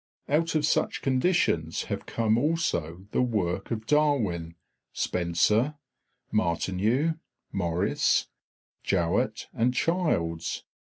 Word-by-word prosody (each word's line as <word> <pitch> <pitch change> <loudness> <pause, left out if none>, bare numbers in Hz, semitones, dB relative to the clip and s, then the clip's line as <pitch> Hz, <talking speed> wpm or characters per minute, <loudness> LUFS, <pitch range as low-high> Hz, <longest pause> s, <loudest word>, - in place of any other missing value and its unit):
Out 160 +3 +1
of 150 -1 +3
such - - 0
conditions 130 - +1
have - - -5
come 110 -1 +1
also 105 - -1
the - - +2
work 95 -6 -1
of 110 -2 -3
Darwin, 115 - +1 0.4
Spencer, 100 - +1 0.6
Martineau, 110 - +1 0.3
Maurice, 85 -3 +1 0.6
Jowett, 85 -4 0
and 125 +2 +1
Childs. 125 - 0
110 Hz, 95 wpm, -27 LUFS, -, 0.6 s, of